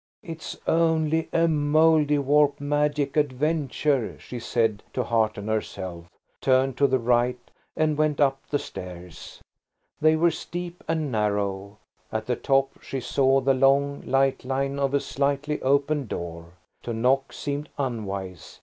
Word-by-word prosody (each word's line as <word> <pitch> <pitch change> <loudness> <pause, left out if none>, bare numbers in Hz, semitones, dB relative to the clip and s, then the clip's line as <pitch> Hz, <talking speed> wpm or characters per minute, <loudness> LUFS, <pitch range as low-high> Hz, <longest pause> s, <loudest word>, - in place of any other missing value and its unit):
"It's 165 -2 -7
only 160 -1 +2
a 165 0 +3
Mouldiwarp 150 -2 +3
magic 145 0 0
adventure," 145 -2 0
she 125 - -8
said, 115 -3 0
to - - 0
hearten 110 -3 0
herself, 95 -5 -4 0.3
turned 130 0 +2
to 140 - +4
the 130 0 +2
right, 120 +1 +2 0.4
and 155 -1 +2
went 155 -2 +1
up 135 -2 +2
the 145 - +1
stairs. 90 - -9 0.6
They 155 +1 +4
were 170 +2 +3
steep 175 +1 -6
and 160 -3 -1
narrow. 100 -2 -1 0.3
At 110 0 -2
the 125 - 0
top 135 +2 0
she 135 - -4
saw 135 +1 +2
the 135 +1 +3
long, 140 +2 +2
light 135 0 +1
line 135 +2 -2
of 140 0 +1
a - - +4
slightly 140 +2 -1
opened 140 +1 +1
door. 85 -2 -6 0.3
To 120 - -4
knock 130 +4 +1
seemed 145 +1 -4
unwise. 100 - -5
135 Hz, 140 wpm, -25 LUFS, 115-150 Hz, 0.6 s, to